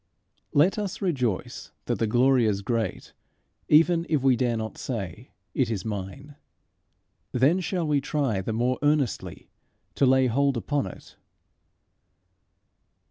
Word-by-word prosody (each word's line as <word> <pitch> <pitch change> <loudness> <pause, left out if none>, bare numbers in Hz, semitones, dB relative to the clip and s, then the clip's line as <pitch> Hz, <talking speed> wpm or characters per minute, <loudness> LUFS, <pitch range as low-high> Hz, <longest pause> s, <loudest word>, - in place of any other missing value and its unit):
Let 175 +9 +3
us 200 -3 -4
rejoice 125 - -2
that - - -2
the 115 - +1
glory 125 +2 +3
is 100 -2 -1
great, 115 -3 -3 0.6
even 165 +2 +4
if 150 -5 +1
we 135 -2 +5
dare 120 -2 0
not 110 0 -5
say, 110 -1 -5 0.2
It 130 -5 +1
is 100 -5 -3
mine. 110 +8 -6 1.0
Then 140 +9 +3
shall 180 -1 -2
we 145 -2 +2
try 135 -9 -1
the 105 - -3
more 120 +3 0
earnestly 145 -4 -1 0.4
to 140 - +2
lay 130 0 +4
hold 135 +2 +1
upon 140 -2 -1
it. - - -12
130 Hz, 135 wpm, -26 LUFS, 115-145 Hz, 1.0 s, we